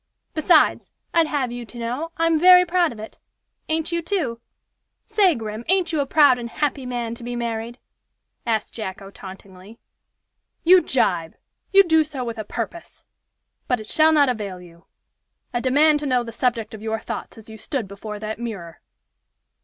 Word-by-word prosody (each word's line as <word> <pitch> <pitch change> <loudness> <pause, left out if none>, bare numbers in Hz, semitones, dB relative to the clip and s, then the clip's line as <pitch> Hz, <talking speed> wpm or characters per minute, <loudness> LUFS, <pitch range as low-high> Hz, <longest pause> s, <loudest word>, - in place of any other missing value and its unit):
Besides, 310 0 +3 0.2
I'd 330 -2 +4
have 275 -5 -1
you 245 0 -6
to 240 +1 -13
know, 250 +8 -4
I'm 330 -1 +2
very 360 +1 +8
proud 350 -2 +2
of 230 - -10
it. 220 +1 -10 0.5
Ain't 320 +1 -1
you, 340 0 0
too? 315 - -2 0.6
Say, 410 -6 +3
Grim! 220 -1 -6
ain't 365 -3 +2
you 310 - +1
a 280 - 0
proud 285 -4 +5
and 235 -1 -6
happy 275 -1 -2
man 240 -2 -3
to 235 - -10
be 245 +1 -4
married?" 235 0 -4 0.7
asked 220 -2 -1
Jacko, 195 -2 -7
tauntingly. 190 +2 -12 0.9
"You 365 +2 +7
jibe! 175 - 0 0.4
You 395 0 +8
do 320 -3 +4
so 290 -4 -6
with 230 -2 -5
a - - -3
purpose. 235 +11 -7 0.6
But 250 - +1
it 215 - -8
shall 315 +8 +4
not 295 -3 +5
avail 205 -7 -3
you. 170 -1 -17 0.7
I 240 - 0
demand 295 +4 +4
to 290 - -4
know 250 -2 +2
the 230 - -8
subject 230 -2 -1
of 215 - -9
your 220 0 -2
thoughts - - -7
as 225 - -13
you 220 -1 -11
stood 245 -1 -3
before 210 +2 -7
that 215 +1 -5
mirror." 195 -9 -7
240 Hz, 175 wpm, -22 LUFS, 220-310 Hz, 0.9 s, very